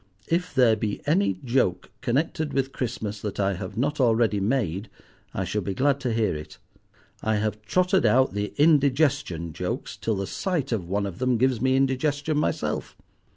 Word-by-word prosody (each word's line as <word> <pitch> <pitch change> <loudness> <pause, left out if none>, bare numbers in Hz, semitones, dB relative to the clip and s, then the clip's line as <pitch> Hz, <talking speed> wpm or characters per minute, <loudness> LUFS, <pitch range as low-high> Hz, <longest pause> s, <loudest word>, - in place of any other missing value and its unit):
If 175 -1 -1
there 125 -4 +5
be 105 -1 -3
any 100 -1 +2
joke 115 -8 0
connected 145 +4 -1
with 135 0 0
Christmas 105 -5 -4
that 105 -2 -4
I 100 0 +2
have 95 +3 -6
not 145 +5 0
already 115 -4 +3
made 100 -3 -1 0.4
I - - -2
should - - -2
be 95 - -3
glad 140 +3 +2
to 125 -3 -2
hear 110 -6 +1
it. 75 0 -8 0.6
I 110 0 +1
have 105 0 -1
trotted 185 - +2
out 130 -2 +4
the 100 0 -2
indigestion 140 - +2
jokes - - -4
till 110 - -1
the 100 0 -2
sight 160 - -2
of 95 -7 -2
one 100 +1 0
of 95 -3 -6
them 130 -2 +2
gives 130 -1 +1
me 130 0 +3
indigestion 145 +3 +1
myself. - - -2
120 Hz, 175 wpm, -25 LUFS, 100-135 Hz, 0.6 s, there